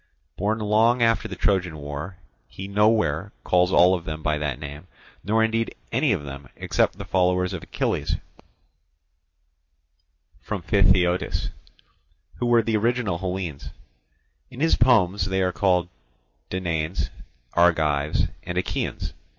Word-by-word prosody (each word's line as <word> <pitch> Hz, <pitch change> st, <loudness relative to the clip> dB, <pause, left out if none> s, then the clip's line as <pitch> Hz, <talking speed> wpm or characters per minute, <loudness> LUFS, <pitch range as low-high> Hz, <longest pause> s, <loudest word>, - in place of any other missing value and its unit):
Born 105 Hz, +4 st, 0 dB
long 110 Hz, +3 st, +3 dB
after 115 Hz, 0 st, +2 dB
the -, -, -6 dB
Trojan 90 Hz, -5 st, 0 dB
War, 75 Hz, +5 st, -6 dB, 0.3 s
he 95 Hz, -, -8 dB
nowhere 105 Hz, -4 st, +2 dB
calls 90 Hz, 0 st, +3 dB
all 90 Hz, +1 st, +6 dB
of 90 Hz, -3 st, -2 dB
them 75 Hz, -1 st, -6 dB
by 75 Hz, -1 st, 0 dB
that 75 Hz, -4 st, -2 dB
name, 75 Hz, +3 st, -8 dB, 0.4 s
nor 110 Hz, +2 st, +2 dB
indeed 115 Hz, +1 st, 0 dB, 0.2 s
any 130 Hz, +3 st, +2 dB
of 90 Hz, -8 st, 0 dB
them 70 Hz, -2 st, -9 dB
except -, -, 0 dB
the -, -, -7 dB
followers 90 Hz, 0 st, +1 dB
of 90 Hz, -, -4 dB
Achilles -, -, -1 dB, 2.3 s
from -, -, -4 dB
Phthiotis, 90 Hz, -1 st, +2 dB, 0.9 s
who 120 Hz, -, -1 dB
were 120 Hz, -1 st, +4 dB
the 110 Hz, -1 st, +1 dB
original 115 Hz, -5 st, 0 dB
Hellenes: 90 Hz, -6 st, -4 dB, 0.8 s
in 125 Hz, 0 st, -11 dB
his 160 Hz, +2 st, +3 dB
poems 105 Hz, -6 st, +3 dB
they 95 Hz, 0 st, 0 dB
are 90 Hz, -, +1 dB
called 90 Hz, -3 st, +2 dB, 0.6 s
Danaans, 85 Hz, -2 st, -2 dB, 0.4 s
Argives, 80 Hz, -4 st, +2 dB, 0.2 s
and 90 Hz, -, -5 dB
Achaeans. 90 Hz, -, -2 dB
90 Hz, 130 wpm, -24 LUFS, 80-105 Hz, 2.3 s, all